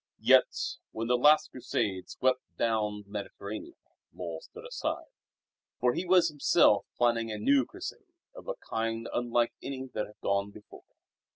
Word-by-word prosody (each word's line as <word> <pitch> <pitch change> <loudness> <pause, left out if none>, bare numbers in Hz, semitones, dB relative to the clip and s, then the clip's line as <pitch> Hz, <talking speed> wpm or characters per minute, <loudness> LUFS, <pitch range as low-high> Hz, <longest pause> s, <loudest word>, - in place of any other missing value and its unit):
Yet, - - +4
when 115 +1 -4
the 125 +1 +3
last 150 +5 +5
Crusade 105 -7 -2
swept 130 0 +1 0.2
down 105 -2 0
the 100 - -26
Mediterranean, 105 0 -6 0.4
Lull 85 -3 -6
stood - - -12
aside; - - -4 0.7
for 125 0 +3
he 180 - -2
was 180 -1 +6
himself 145 -2 +4
planning 115 -2 +2
a 105 - -3
new 275 +1 +3
Crusade 375 +1 -8 0.3
of - - -11
a - - -2
kind 115 0 -2
unlike 120 -1 +1
any 135 -1 -5
that 105 - -2
had 105 - -18
gone 100 0 0
before. 105 +1 -14
115 Hz, 155 wpm, -30 LUFS, 105-130 Hz, 0.7 s, was